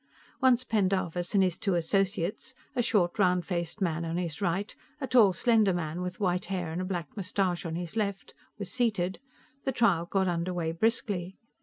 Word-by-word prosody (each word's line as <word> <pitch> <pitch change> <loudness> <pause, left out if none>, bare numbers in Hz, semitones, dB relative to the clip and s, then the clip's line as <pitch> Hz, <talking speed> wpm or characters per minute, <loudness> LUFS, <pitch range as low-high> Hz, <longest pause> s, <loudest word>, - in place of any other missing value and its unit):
Once 255 -1 +4
Pendarvis 185 -4 0
and 195 - +6
his 180 -2 0
two 195 -4 +1
associates 195 +7 0 0.2
a 245 - +2
short, 205 -5 +1
roundfaced 180 0 +1
man 170 -3 0
on 165 +1 -2
his 175 0 -3
right, 195 +2 -1 0.2
a 270 - -2
tall, 235 -7 +6
slender 215 +1 +3
man 170 0 -3
with 180 0 -5
white 180 -2 +1
hair 180 -3 -3
and 170 +3 -3
a - - -2
black 175 -5 -4
mustache 185 -3 -1
on 160 - -4
his 175 +1 -5
left 200 -3 -2 0.2
were 205 - -4
seated, 200 -5 0 0.4
the 270 - 0
trial 195 -9 +2
got 190 0 +1
underway 170 -1 -1
briskly. 190 -1 -1
185 Hz, 175 wpm, -29 LUFS, 175-205 Hz, 0.4 s, and